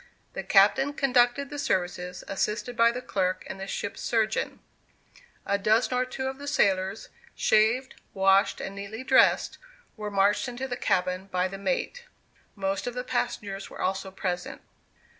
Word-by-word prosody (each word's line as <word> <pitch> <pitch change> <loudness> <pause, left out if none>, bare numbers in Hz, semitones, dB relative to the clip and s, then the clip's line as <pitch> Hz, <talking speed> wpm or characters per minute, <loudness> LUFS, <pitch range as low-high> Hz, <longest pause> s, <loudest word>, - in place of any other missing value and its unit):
The - - -3
captain 240 +8 +4
conducted 270 0 +2
the 290 - -5
services, 180 -4 -2
assisted 210 +5 -2
by 230 0 +5
the 250 +1 -6
clerk 185 -4 -1
and 195 - -7
the 195 - -5
ship's 200 0 -4
surgeon. 220 -2 0 0.9
A 200 - 0
dozen 220 +5 +2
or 250 0 +1
two 265 +1 -5
of 265 +1 -4
the 285 - -8
sailors, 195 -6 +1 0.3
shaved, 225 +5 +2 0.2
washed, 195 +1 +3
and 195 - -5
neatly 200 +5 -6
dressed, 260 0 +4 0.4
were 215 -1 -5
marched 200 +4 +2
into 245 +2 -4
the 245 - -3
cabin 185 -4 0
by 185 -1 0
the 195 +1 -8
mate; 280 - -2 0.5
most 195 0 -2
of 245 - -4
the 250 - -3
passengers 200 -6 -3
were - - -11
also 190 +1 -1
present. 180 -2 -4
210 Hz, 160 wpm, -27 LUFS, 195-250 Hz, 0.9 s, by